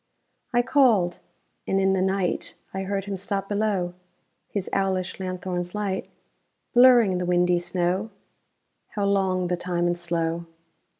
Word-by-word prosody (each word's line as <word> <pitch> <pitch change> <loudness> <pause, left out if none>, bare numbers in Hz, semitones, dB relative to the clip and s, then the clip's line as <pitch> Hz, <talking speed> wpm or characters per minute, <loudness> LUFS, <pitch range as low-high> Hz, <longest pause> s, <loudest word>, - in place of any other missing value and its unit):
I 240 -1 +3
called. 240 -10 +3 0.5
And 195 - +2
in 190 0 +3
the 190 - +1
night 190 -1 -1 0.2
I 190 - -2
heard 195 0 -2
him 200 -1 -3
stop 195 +1 -3
below, 200 -4 0 0.6
His 200 -3 -3
owlish 190 -2 -1
lanthorn's 185 -1 -4
light 200 -2 -2 0.7
Blurring 240 -7 +6
the 180 - -1
windy 180 0 +3
snow 180 +4 -1 0.9
How 205 -1 0
long 190 -2 +1
the 180 - 0
time 175 -1 -1
and 175 0 +1
slow! 170 -1 -2
190 Hz, 135 wpm, -25 LUFS, 175-200 Hz, 0.9 s, Blurring